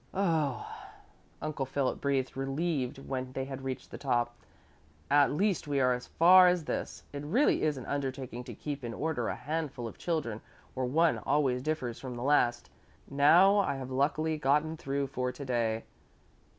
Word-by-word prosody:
"Oh," 160 - 0 0.8
Uncle 150 -3 -3
Philip 135 0 -1
breathed 135 -2 0
relieved 135 0 -2
when 130 -1 -5
they 135 0 -3
had 135 -1 -7
reached 130 -1 -5
the - - -8
top. 120 0 0 0.8
"At 145 0 +5
least 190 +1 0
we 140 -1 0
are 125 -1 +4
as 125 0 -5
far 180 +2 +7
as 180 -3 +2
this. - - -4
It 140 - -4
really 225 - +2
is 150 -2 +1
an 130 - -7
undertaking 130 -3 -4
to - - -8
keep 145 -2 -5
in 115 -1 -5
order 150 -7 -1
a - - -2
handful 145 -4 -4
of - - -11
children 145 -11 -2 0.3
where 130 -1 -2
one 160 +5 +3
always 135 -4 +1
differs 130 -5 -3
from 130 -2 -6
the 120 - -5
last. 120 -4 +2 0.4
Now 175 +9 +6
I 195 - +1
have 130 -1 -6
luckily 155 +4 0
gotten 150 +3 +2
through 140 -2 -2
for 125 -1 -2
today. 120 -4 -1
140 Hz, 170 wpm, -30 LUFS, 130-155 Hz, 0.8 s, far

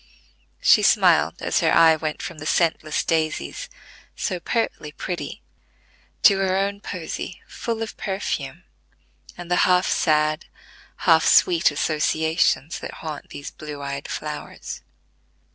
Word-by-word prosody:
She - - +6
smiled - - +3
as - - +1
her - - +2
eye 165 -1 +6
went 155 -1 -4
from 155 - -7
the 155 - -6
scentless 160 -2 +1
daisies, 160 -1 -2 0.5
so 185 -4 -2
pertly 200 -7 -2
pretty, 175 +3 -6 0.8
to 200 -3 +6
her 190 -1 +1
own 200 +1 -1
posy 180 -1 -6
full 230 -1 -4
of 225 - -8
perfume, 195 0 -4 0.7
and 175 0 -9
the 180 - +3
half 180 0 +4
sad, 155 0 +1 0.6
half - - +5
sweet 350 -3 +5
associations 155 +1 0
that - - -7
haunt 155 -2 -6
these 145 - -8
blue 150 -2 -8
eyed 140 0 -5
flowers. 150 -1 -6
160 Hz, 125 wpm, -23 LUFS, 155-190 Hz, 0.8 s, She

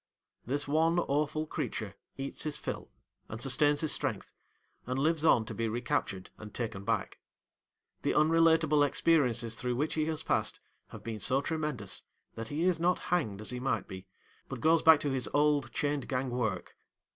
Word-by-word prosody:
This 145 +3 -1
one 160 +3 +2
awful 155 -1 0
creature 110 -8 -4 0.2
eats 135 0 -4
his 150 -1 0
fill, - - -5 0.4
and 110 - -6
sustains 145 +3 +3
his 155 - +1
strength, - - -3 0.5
and 130 +1 -2
lives 155 +3 +1
on 120 -8 +4
to - - -6
be 115 0 -1
recaptured 120 -5 -2
and 110 -1 -9
taken 110 -4 -4
back. - - -2 0.8
The - - 0
unrelateable 160 -1 +4
experiences 125 -7 +2
through 125 +1 -2
which 150 +5 -1
he 155 -1 0
has 160 -1 -2
passed - - 0 0.3
have - - -11
been 110 -2 -5
so 130 +7 +2
tremendous, 150 - -3 0.3
that 115 0 -6
he 150 +7 -2
is 180 -2 +2
not 175 +2 +2 0.2
hanged 110 - 0
as 110 - -1
he 125 - -4
might 125 -6 -1
be, 95 0 -9 0.4
but - - -5
goes 160 +1 +4
back 160 -2 +7
to 145 - -1
his 130 -2 -1
old 145 -4 +2
chained 145 0 -1
gang 130 -1 -2
work. 120 -4 -2
140 Hz, 175 wpm, -31 LUFS, 120-155 Hz, 0.8 s, back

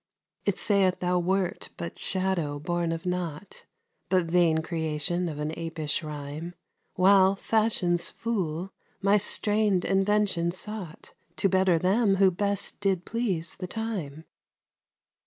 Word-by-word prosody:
It - - +1
saith 195 -3 +3
thou 180 0 +1
wert 185 0 -1
but 85 0 -6
shadow 185 -6 -1
born 170 +2 -1
of 165 +2 -4
nought, 180 0 -4 0.4
But 185 -2 +3
vain 165 -2 +3
creation 165 +2 -1
of 150 - -6
an 150 +1 -2
apish 165 -2 -3
rhyme, 150 +2 -6 0.4
While, 190 +1 +5
Fashion's 195 -5 +1
fool, 190 -5 -3 0.3
my 200 +1 +5
strain'd 205 -2 +2
invention 195 -3 +2
sought 185 -2 -7 0.2
To - - +2
better 185 -2 +3
them 195 +4 +3
who 190 -1 +5
best 200 +2 -2
did 190 -3 0
please 195 -9 -2
the 180 - -4
time. 180 -9 -5
180 Hz, 125 wpm, -27 LUFS, 165-195 Hz, 0.4 s, While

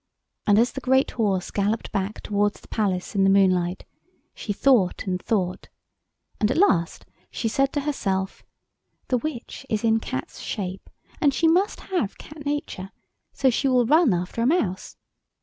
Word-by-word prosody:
And 205 -1 +5
as 235 +3 +4
the 270 - -6
great 265 +1 +2
horse 200 -6 -1
galloped 210 +3 -1
back 200 +1 -3
towards 205 0 0
the - - -19
palace 195 -4 -1
in 195 -2 +2
the 195 - +5
moonlight, 185 -2 +2 0.5
she 210 - -5
thought 205 -4 +2
and 185 -2 -2
thought, 185 -5 -2 0.7
and 210 - +2
at 260 - 0
last 175 - +2 0.2
she 230 - -3
said 275 +5 +1
to 290 - 0
herself— 195 -10 -2 0.7
"The 250 - +2
witch 270 -3 -6
is 215 0 -1
in 225 -1 +3
cat's 130 -11 -5
shape, 190 -2 -5 0.3
and 285 -4 +3
she 330 - +3
must 365 +6 +2
have 345 - -2
cat 300 -1 -10
nature, 285 -10 -3 0.4
so 265 -2 +2
she 270 +4 0
will 250 -2 +3
run 310 +1 +5
after 180 +5 -2
a 235 - +3
mouse. 225 - -1
220 Hz, 165 wpm, -24 LUFS, 190-270 Hz, 0.7 s, And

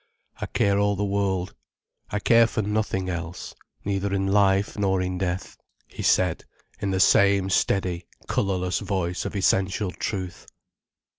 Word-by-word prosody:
"I - - -4
care 100 0 +1
all 100 0 +2
the 100 +1 -1
world—I 100 0 -4
care 115 +2 +5
for 110 - -2
nothing 105 -2 -1
else—neither 90 +3 -5
in 95 -1 0
life 100 0 +2
nor 95 -2 +1
in 90 0 -2
death," 90 0 -3 0.3
he - - -9
said, 90 -3 +2 0.4
in 100 - -2
the 95 -1 0
same 100 0 +4
steady, 90 -3 0 0.2
colourless 90 -2 0
voice 95 -3 -2
of - - -4
essential 95 0 +1
truth. 95 -2 -5
95 Hz, 135 wpm, -25 LUFS, 90-100 Hz, 0.4 s, care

